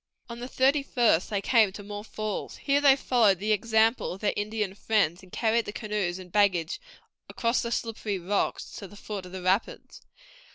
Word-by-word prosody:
On 235 0 -7
the 245 - -5
thirty 270 +3 +2
first 235 -10 +2
they 200 -2 -1
came 220 -4 +4
to 205 - -8
more 205 0 -7
falls. 215 -1 -5
Here 285 0 +1
they 280 -2 +7
followed 235 -7 +3
the 210 +4 -1
example 220 +2 +2
of 190 - -10
their 210 - +1
Indian 210 -1 -2
friends, 195 -4 0
and 185 -1 -17
carried 230 0 +1
the - - -5
canoes 210 -5 -2
and 185 -1 -11
baggage 185 -5 +1 0.5
across 235 0 0
the 235 - -4
slippery 220 -4 -2
rocks 190 +3 -2
to 200 - -7
the 205 - -14
foot 200 -3 -6
of - - -13
the 185 -1 -7
rapids. 190 +4 -1
210 Hz, 195 wpm, -27 LUFS, 195-230 Hz, 0.5 s, they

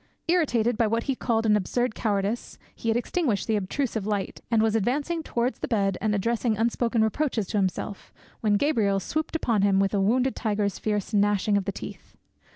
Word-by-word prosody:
Irritated 245 -10 +2
by 230 - +4
what 230 +2 0
he 270 - 0
called 230 -3 0
an 210 -1 +4
absurd 230 +4 0
cowardice, 210 +1 -2 0.2
he - - -7
had 225 - +3
extinguished 245 - 0
the 220 - +1
obtrusive 215 +1 -2
light, 205 -2 -2
and 230 -2 +3
was 220 0 +2
advancing 285 - 0
towards 245 -4 -2
the - - -3
bed, 200 -5 +1
and 215 -1 +1
addressing 230 +2 0
unspoken 230 0 +1
reproaches 225 -1 0
to - - -1
himself, 195 +1 -3 0.3
when 210 -2 +2
Gabriel 210 -8 +2
swooped 310 - -3
upon 230 -10 +1
him 195 -1 +3
with 195 +1 +1
a 200 - +2
wounded 250 +6 +2
tiger's 205 -3 -1
fierce 210 0 -2
gnashing 205 0 +2
of 200 -2 +1
the 200 - -1
teeth. - - -10
220 Hz, 190 wpm, -26 LUFS, 205-240 Hz, 0.3 s, by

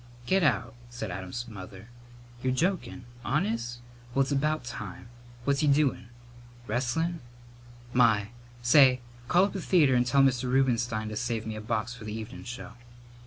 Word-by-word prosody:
"Get 190 +6 +3
out," 120 -7 +1 0.2
said 120 -5 -5
Adam's 95 +7 -5
mother. 95 -1 -10 0.5
"You're 130 0 +1
jokin'!... 165 -4 -1 0.2
Honest? 115 +3 -1 0.3
Well, 135 - +5
it's 135 - -4
about 150 +2 +1
time! 115 -2 -7 0.3
What's 140 +1 +1
he 150 - +2
doin'?... 140 -4 +2 0.6
Wrestlin'? 130 +9 -1 0.7
My! 110 -4 +4 0.3
Say, 130 0 +6 0.3
call 180 +7 +5
up 200 - 0
the 195 - -3
theatre 160 -7 +4
and 125 0 +3
tell 135 +2 +5
Mr. 130 -1 +2
Rubenstein 115 -4 +1
to 105 - -5
save 115 0 -2
me 110 -1 -4
a 110 - -6
box 110 +2 -2
for 120 -3 -10
the 105 - -5
evenin' 110 - -8
show." 125 0 -7
120 Hz, 160 wpm, -28 LUFS, 110-140 Hz, 0.7 s, Say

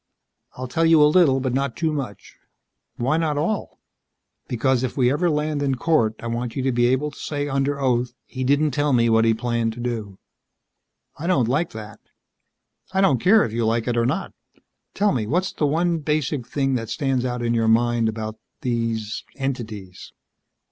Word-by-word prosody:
"I'll 130 0 -4
tell 160 +6 0
you 165 -1 +6
a - - +8
little, 150 -4 +4
but 130 -1 -2
not 135 -2 -1
too 160 -1 -1
much." 130 -9 -6 0.6
"Why 135 +6 +1
not 155 -3 0
all?" 185 +8 -2 0.7
"Because 125 +1 +1
if 130 +1 -3
we 125 -2 +3
ever 170 +5 +1
land 150 -1 -1
in 135 -2 +1
court. 120 -6 +1
I - - -8
want 115 0 -3
you 135 - -2
to 135 - +1
be 120 0 +2
able 130 +4 +1
to - - -14
say 145 -1 -3
under 140 +1 0
oath, 125 -2 0
'He 130 -1 -5
didn't 145 +3 +2
tell 145 +1 +1
me 115 -2 +3
what 115 0 +4
he 115 -1 +3
planned 115 -1 -1
to 120 - -11
do.'" 115 -5 -4 1.0
"I 165 - -4
don't 135 -11 +2
like 150 +7 0
that." 110 -1 -9 0.9
"I 190 - 0
don't 140 -10 +3
care 215 +3 +5
if 110 - -6
you 115 0 0
like 115 +1 0
it 120 - 0
or 120 0 +2
not. 165 +9 -2 0.6
Tell 205 +1 +2
me, 115 -6 -1
what's 180 - 0
the 150 - 0
one 165 +3 +1
basic 150 -4 -1
thing 135 0 0
that 115 -3 -2
stands 135 0 0
out 125 -1 -2
in 120 0 +1
your 115 -1 +1
mind 115 0 +3
about 110 0 -5 0.2
these 115 -3 -2
entities?" 110 -9 -5
130 Hz, 195 wpm, -23 LUFS, 115-150 Hz, 1.0 s, a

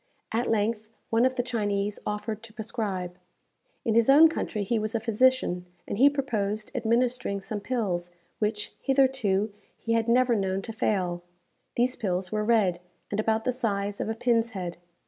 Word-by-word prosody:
At 235 +2 0
length 215 0 0 0.2
one 230 +3 +4
of 260 - -4
the 245 - 0
Chinese 205 -4 -1
offered 210 +1 -3
to 230 -2 -12
prescribe. 200 -6 -4 0.7
In 225 - +2
his 230 +2 +4
own 310 +4 +8
country 215 -9 -2
he 225 +3 0
was 215 +2 -3
a - - +2
physician, 225 -5 +2 0.2
and 200 - -3
he 275 +3 +8
proposed 215 -7 -2
administering 235 -2 +1
some 205 +2 -4
pills, 200 -7 -2 0.3
which, 210 -1 -1
hitherto, 255 -7 +2 0.2
he 230 - -2
had 230 0 +1
never 245 0 +4
known 195 -1 -1
to 225 - -6
fail. 180 -5 0 0.5
These 250 +2 +1
pills 185 -3 -2
were 215 0 0
red, 210 -6 +3 0.3
and 205 - -1
about 220 0 +1
the 255 - +1
size 205 -5 -2
of - - -2
a 220 - -1
pin's 230 0 +1
head. 175 -2 -4
220 Hz, 170 wpm, -27 LUFS, 200-240 Hz, 0.7 s, own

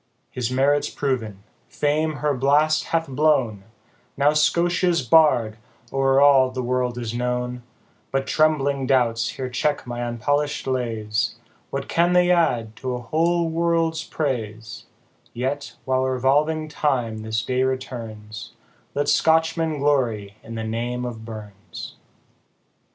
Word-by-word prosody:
His 125 -2 -2
merits 140 +3 +2
proven 115 -8 -3 0.3
fame 155 +2 0
her 150 0 0
blast 145 +4 +2
hath 165 0 -1
blown, 130 -7 +1 0.5
Now 145 +2 +4
Scotia's 170 +2 +2
Bard 120 -5 +4 0.4
o'er 135 0 +3
all 140 -2 +6
the 130 0 -4
world 125 0 -1
is 120 -2 -4
known 125 0 -2 0.5
But 135 0 -1
trembling 140 -3 +1
doubts 115 -4 +2
here 130 - -5
check 145 +4 -1
my 120 0 -4
unpolished 145 +6 -1
lays, 115 -5 -1 0.3
What 135 0 -4
can 175 +1 +2
they 180 0 +4
add 120 -11 +1
to 130 -1 -3
a - - -4
whole 165 +6 +1
world's 165 -1 0
praise; 115 -8 -4 0.5
Yet, 135 +4 -3
while 130 0 +1
revolving 145 +5 +1
time 130 -7 -1
this 110 +1 -2
day 130 0 0
returns, 115 -5 -4 0.4
Let 145 0 0
Scotchmen 160 +1 +2
glory 120 -8 0
in 115 - -9
the 110 - -3
name 120 +2 -3
of 115 -2 -6
BURNS. 105 -4 -9
130 Hz, 130 wpm, -23 LUFS, 120-150 Hz, 0.5 s, all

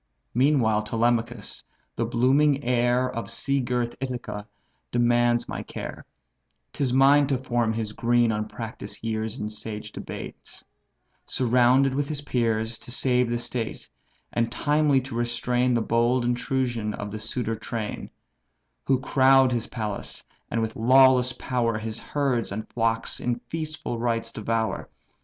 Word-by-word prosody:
Meantime 120 -5 +3
Telemachus, 115 0 -1 0.3
the 115 - 0
blooming 135 +5 +3
heir 120 +1 +2
Of 115 -2 -5
sea 140 0 0
girt 120 -1 -1
Ithaca, 120 -5 -4 0.4
demands 120 0 +2
my - - -4
care; - - -7 0.7
'Tis 135 -3 -1
mine 140 +2 +5
to 135 -2 +1
form 120 -3 0
his 110 -1 -3
green, 120 0 +2
unpractised 110 +2 -5
years 110 +1 -2
In 105 - -3
sage 105 0 -6
debates; - - -9 0.6
surrounded 125 +2 +3
with 140 +1 -1
his 150 -2 -3
peers, 115 -4 -1
To - - -12
save 125 -1 +1
the 120 - 0
state, 120 -1 -4 0.5
and 115 0 0
timely 145 -1 +2
to 130 0 -8
restrain 120 +1 +1
The 115 - +1
bold 120 +2 +2
intrusion 120 -3 -1
of 105 0 -6
the 110 - -5
suitor 115 +1 -2
train; 110 -1 -5 0.8
Who 135 -2 +3
crowd 135 -1 +5
his 120 -2 -1
palace, 105 -4 -5 0.3
and 115 -1 0
with 110 0 -3
lawless 130 +1 +5
power 120 -4 -1
His 110 0 -5
herds 135 -7 -1
and 110 +2 -4
flocks 115 -1 0
in 120 -1 0
feastful 155 -7 -4
rites 115 -1 -1
devour. 110 0 -2
120 Hz, 140 wpm, -25 LUFS, 115-130 Hz, 0.8 s, mine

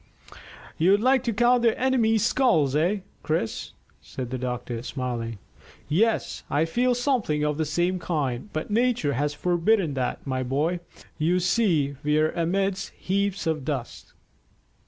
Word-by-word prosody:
"You'd 190 +5 +5
like 255 +2 +3
to 235 - +1
count 240 +3 +3
their 230 -2 +2
enemies' 230 -4 +2
skulls, 190 - +2
eh, 180 +7 +1 0.2
Chris?" 155 -8 -2 0.3
said 125 -2 -7
the 130 - -3
doctor, 125 -2 -4
smiling. 120 -3 -4 0.5
"Yes, 215 +9 +1
I 145 +3 +2
feel 245 +9 +1
something 240 - 0
of 150 0 -1
the 160 - +1
same 175 +4 0
kind; 145 - -2
but 155 +6 -4
nature 230 - +1
has 145 +3 -1
forbidden 175 +1 +1
that, 130 -2 -3
my 130 -2 -1
boy. 145 +8 0 0.4
You 170 +4 +2
see 170 - +1
we 150 +1 +2
are 155 +1 +2
amidst 195 +3 -1
heaps 200 +1 -1
of 160 -3 -1
dust." 135 -4 -5
165 Hz, 145 wpm, -25 LUFS, 145-215 Hz, 0.5 s, You'd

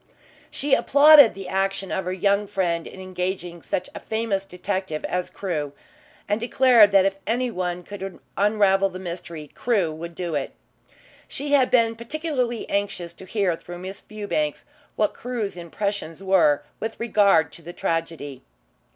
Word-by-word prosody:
She 285 -1 -1
applauded 285 -3 +7
the 195 -1 -7
action 195 0 -1
of 190 - -2
her 180 - -2
young 200 +2 +1
friend 175 -4 -1
in - - -11
engaging 180 -2 -4
such - - -3
a - - -6
famous 220 -3 -2
detective 185 -3 -3
as 180 0 -2
Crewe, 155 -7 -3 0.5
and 205 +2 0
declared 235 -3 +5
that 195 -1 +5
if 195 0 0
anyone 185 -7 -1
could 195 -1 -7 0.2
unravel 200 -1 +3
the 185 - -8
mystery, 170 -4 -7
Crewe 205 -9 +1
would 170 +2 -8
do 175 -2 -4
it. 145 -2 -2 0.7
She 285 +1 -5
had 270 -3 +4
been 230 -2 +3
particularly 250 -1 -2
anxious 195 -4 -2
to 190 - -13
hear 190 -3 0
through 175 +1 -10
Miss 185 +2 -8
Fewbanks 200 -9 -3 0.3
what 210 -1 +1
Crewe's 235 -6 -4
impressions 175 0 -4
were, 185 -7 +3 0.2
with 225 0 -5
regard 200 -8 +3
to - - -11
the 170 +2 -8
tragedy. 165 -6 -3
195 Hz, 150 wpm, -24 LUFS, 175-215 Hz, 0.7 s, applauded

